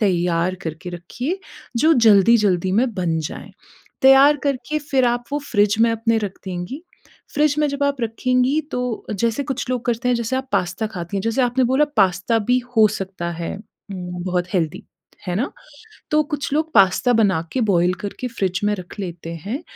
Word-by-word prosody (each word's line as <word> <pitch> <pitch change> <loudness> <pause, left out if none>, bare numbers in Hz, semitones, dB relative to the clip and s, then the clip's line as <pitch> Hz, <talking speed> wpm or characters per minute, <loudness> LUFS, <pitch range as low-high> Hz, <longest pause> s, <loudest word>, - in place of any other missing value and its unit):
तैयार 175 -2 +1
करके 160 +2 -6
रखिए 245 - -4 0.4
जो 315 +6 +4 0.2
जल्दी-जल्दी 195 -3 +4
में 235 +3 +2
बन 170 -4 -1
जाएँ, 150 - -7 0.5
तैयार 270 +2 +7
करके 280 +2 -1
फिर 275 -3 0
आप 240 0 0
वो 290 - +1
फ़्रिज 205 -1 +3
में 230 0 +5
अपने 230 0 +1
रख 205 -3 -5
देंगी, 185 - -5 0.5
फ़्रिज 295 0 +3
में 300 - +3
जब 280 0 -3
आप 280 -2 0
रखेंगी 255 +5 +1
तो 250 -2 -3
जैसे 230 +6 0
कुछ 270 -2 -4
लोग 250 -2 -2
करते 240 +1 0
हैं 250 - +3
जैसे 235 +3 -2
आप 265 0 -4
पास्ता 180 +5 0
खाती 190 -1 -5
हैं, - - 0
जैसे 230 +3 +1
आपने 245 +1 +2
बोला 265 +5 +3
पास्ता 195 +3 +2
भी 250 0 +4 0.2
हो 215 -1 +7
सकता 190 -4 -4
है 170 0 -4
उम, 180 -4 -8
बहुत 180 -1 -1
हेल्थी, 165 -4 -1 0.4
है 175 - -2
ना? 250 +7 -1 0.6
तो 305 0 +4
कुछ 290 -1 -4
लोग 315 +1 0
पास्ता 195 +6 +4
बना 200 -7 +3
के 260 - 0
बॉयल 175 0 +3
करके 225 +5 -4
फ़्रिज 190 -5 -2
में 210 0 +2
रख 180 +3 -10
लेते 170 -3 -6
हैं, 260 +10 -4
225 Hz, 180 wpm, -21 LUFS, 185-260 Hz, 0.6 s, तैयार